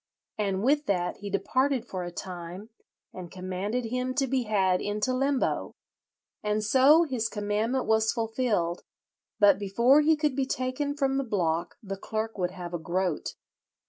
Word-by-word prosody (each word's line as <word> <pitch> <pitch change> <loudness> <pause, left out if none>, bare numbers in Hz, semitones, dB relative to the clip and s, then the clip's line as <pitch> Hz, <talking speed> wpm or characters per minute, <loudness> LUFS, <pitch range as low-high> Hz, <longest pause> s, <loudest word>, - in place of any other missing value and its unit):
and 195 -1 0
with 290 +3 +2
that 180 -2 0
he 205 0 -7
departed 255 +6 0
for 185 -6 -5
a 175 - -4
time, 180 +3 -7 0.4
and 180 -2 -8
commanded 190 +6 -3
him 250 +2 -2
to 270 0 +2
be 260 -1 0
had 190 -4 +2
into 210 +5 -1
limbo. 270 +1 0 0.7
And 210 0 0
so 270 +9 +6
his 250 -8 -2
commandment 215 +5 -1
was 220 0 +3
fulfilled; 225 -7 -1 0.6
but 200 -2 +6
before 235 +8 +4
he 315 +1 +4
could 300 -3 0
be 270 -1 0
taken 255 +3 -2
from 270 -1 +1
the 275 - +1
block 175 -7 -1
the 195 -1 -5
clerk 220 +3 -3
would 180 -2 -1
have 180 -2 -8
a 175 - -2
groat. 175 0 -2
215 Hz, 160 wpm, -28 LUFS, 190-255 Hz, 0.7 s, so